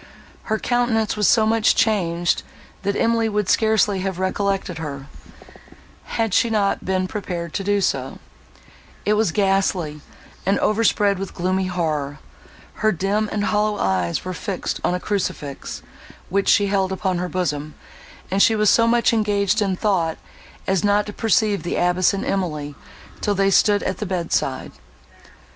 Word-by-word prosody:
Her 220 Hz, -, 0 dB
countenance 240 Hz, -2 st, 0 dB
was 210 Hz, -2 st, +2 dB
so 220 Hz, -2 st, +4 dB
much 220 Hz, 0 st, +3 dB
changed, 175 Hz, -6 st, +1 dB, 0.4 s
that 200 Hz, +1 st, -1 dB
Emily 230 Hz, -1 st, +1 dB
would 210 Hz, -2 st, -1 dB
scarcely 215 Hz, -3 st, +2 dB
have 190 Hz, -1 st, -3 dB
recollected 190 Hz, -2 st, -1 dB
her, 140 Hz, -3 st, -6 dB, 1.1 s
had 225 Hz, -4 st, 0 dB
she 235 Hz, -, +3 dB
not 205 Hz, -3 st, 0 dB
been 185 Hz, 0 st, 0 dB
prepared 175 Hz, -5 st, -5 dB
to 195 Hz, -, -2 dB
do 205 Hz, +1 st, +1 dB
so: 135 Hz, -7 st, -1 dB, 0.9 s
it 210 Hz, -, +3 dB
was 215 Hz, -4 st, +2 dB
ghastly, 190 Hz, -6 st, 0 dB, 0.4 s
and 195 Hz, +2 st, +2 dB
overspread 210 Hz, -2 st, +2 dB
with 195 Hz, -1 st, -6 dB
gloomy 185 Hz, +1 st, 0 dB
horror; 155 Hz, -6 st, -2 dB, 0.6 s
her 215 Hz, -, +4 dB
dim 200 Hz, +4 st, -1 dB
and 205 Hz, -, -1 dB
hollow 210 Hz, 0 st, +1 dB
eyes 90 Hz, -, -1 dB
were 185 Hz, -, -3 dB
fixed 195 Hz, 0 st, -4 dB
on 180 Hz, -, +1 dB
a -, -, -2 dB
crucifix, 180 Hz, -8 st, -4 dB, 0.5 s
which 200 Hz, +2 st, +1 dB
she 205 Hz, -, +5 dB
held 195 Hz, -1 st, 0 dB
upon 190 Hz, -2 st, -1 dB
her 180 Hz, 0 st, -3 dB
bosom; 155 Hz, -4 st, -2 dB, 0.6 s
and 195 Hz, +1 st, +2 dB
she 220 Hz, -, +5 dB
was 210 Hz, -1 st, +4 dB
so 230 Hz, 0 st, +4 dB
much 235 Hz, 0 st, +3 dB
engaged 210 Hz, -1 st, +1 dB
in 195 Hz, -2 st, +1 dB
thought, 180 Hz, -5 st, 0 dB, 0.5 s
as 190 Hz, -2 st, 0 dB
not 205 Hz, 0 st, +3 dB
to 210 Hz, -, -7 dB
perceive 215 Hz, -2 st, +1 dB
the 175 Hz, -, -3 dB
abbess 180 Hz, +1 st, +2 dB
and 195 Hz, -, -3 dB
Emily, 150 Hz, -7 st, -2 dB, 0.5 s
till 205 Hz, -, 0 dB
they 195 Hz, 0 st, +2 dB
stood 205 Hz, +2 st, +4 dB
at 190 Hz, -, -3 dB
the 210 Hz, -, -3 dB
bedside. 180 Hz, -3 st, -2 dB
195 Hz, 155 wpm, -21 LUFS, 180-210 Hz, 1.1 s, she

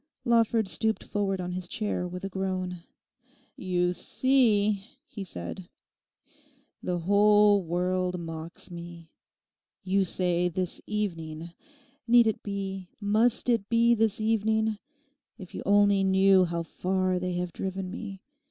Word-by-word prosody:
Lawford 230 Hz, -2 st, +3 dB
stooped 220 Hz, +3 st, 0 dB
forward 195 Hz, -2 st, -2 dB
on 180 Hz, 0 st, -4 dB
his 180 Hz, 0 st, -4 dB
chair 210 Hz, -4 st, -2 dB
with 180 Hz, +1 st, -7 dB
a -, -, -2 dB
groan. 185 Hz, -2 st, -3 dB, 0.7 s
'You 180 Hz, -1 st, 0 dB
see,' 215 Hz, -2 st, +2 dB, 0.2 s
he 205 Hz, -9 st, -7 dB
said, 175 Hz, -, -7 dB, 1.1 s
'the 180 Hz, -1 st, -2 dB
whole 205 Hz, +2 st, +5 dB
world 180 Hz, +1 st, -1 dB
mocks 165 Hz, +2 st, -7 dB
me. 170 Hz, -1 st, -10 dB, 0.7 s
You 195 Hz, +1 st, +2 dB
say 180 Hz, -1 st, 0 dB
"this 180 Hz, +1 st, -3 dB
evening"; 170 Hz, -6 st, -4 dB, 0.6 s
need 240 Hz, 0 st, +6 dB
it 220 Hz, -, 0 dB
be, 195 Hz, -2 st, -5 dB
must 220 Hz, +4 st, +1 dB
it 230 Hz, -5 st, +1 dB
be 235 Hz, 0 st, +4 dB
this 220 Hz, -2 st, +1 dB
evening? 220 Hz, 0 st, +1 dB, 0.6 s
If 185 Hz, -3 st, -11 dB
you -, -, -5 dB
only 200 Hz, -1 st, +4 dB
knew 190 Hz, 0 st, +5 dB
how 170 Hz, -1 st, -3 dB
far 185 Hz, +2 st, -1 dB
they 180 Hz, 0 st, -2 dB
have 175 Hz, -1 st, -3 dB
driven 190 Hz, -1 st, -4 dB
me. 200 Hz, -3 st, -7 dB
190 Hz, 130 wpm, -27 LUFS, 180-210 Hz, 1.1 s, need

